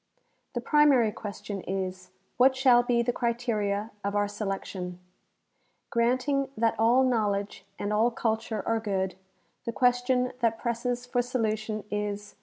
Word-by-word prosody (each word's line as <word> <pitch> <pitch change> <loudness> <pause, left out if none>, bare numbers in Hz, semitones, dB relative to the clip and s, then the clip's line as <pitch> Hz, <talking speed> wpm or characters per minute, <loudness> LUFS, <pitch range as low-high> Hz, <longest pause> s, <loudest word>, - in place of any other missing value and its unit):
The 240 - -1
primary 275 -5 +4
question 205 -1 -6
is, 185 -1 -4 0.3
What 260 +2 +5
shall 255 -2 +5
be 240 -1 +1
the 245 +1 0
criteria 225 -3 -1
of 200 +1 -2
our 205 0 +2
selection? 195 -3 -4 0.9
Granting 255 +4 +1
that 225 0 +2
all 240 +4 +5
knowledge 205 -6 0
and 205 +1 -2
all 220 +3 +4
culture 220 -2 -2
are 225 0 +2
good, 190 -3 -1 0.5
the 230 - -1
question 250 +1 +2
that 230 -2 +1
presses 240 +1 -2
for 245 0 +1
solution 220 -3 -2
is. 210 0 -3
225 Hz, 135 wpm, -28 LUFS, 205-245 Hz, 0.9 s, What